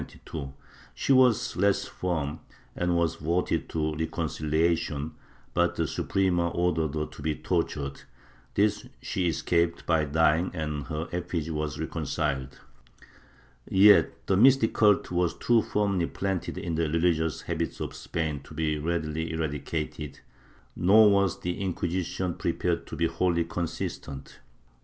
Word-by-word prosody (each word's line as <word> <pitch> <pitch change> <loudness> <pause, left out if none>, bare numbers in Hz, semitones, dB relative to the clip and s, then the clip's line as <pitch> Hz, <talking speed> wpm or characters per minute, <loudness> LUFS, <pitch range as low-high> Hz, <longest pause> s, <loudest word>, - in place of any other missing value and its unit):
She 140 - +2
was 130 -4 +4
less 100 +1 +2
firm 80 -6 -3 0.4
and 90 0 0
was 85 -1 +1
voted 85 +4 -1
to 80 -1 -1
reconciha 80 +1 0
tion, 80 -2 -4 0.4
but 85 0 +2
the 80 - 0
Suprema 90 +2 +1
ordered 80 -3 0
her 75 0 -1
to 75 - -12
be 75 +1 -1
tortured; 70 -2 -2 0.5
this 105 0 +1
she 90 -2 -1
escaped 85 +1 0
by 80 -2 +2
dying, 80 +3 +2
and 75 -3 -3
her 80 +1 -4
effigy 85 -2 -3
was 75 -1 -3
reconciled.^ 75 -4 -2 1.2
Yet 100 +2 +5
the 95 - +2
mystic 125 +2 +5
cult 105 -4 +3
was 90 -1 +1
too 120 -1 +3
firmly 100 -6 0
planted 95 -2 -3
in 85 - -3
the 80 -1 0
religious 80 0 +1
habits 85 -1 -3
of - - -4
Spain 80 -3 -3
to 75 - -12
be 75 -1 0
readily 80 0 -2
eradicated, 75 -1 -4 0.6
nor 105 +4 +6
was 100 -2 +2
the 90 +2 -3
Inquisition 90 -1 -2
prepared - - -1
to - - -6
be 85 - +1
wholly 85 +1 +1
consistent. 80 -5 -5
85 Hz, 135 wpm, -27 LUFS, 75-90 Hz, 1.2 s, nor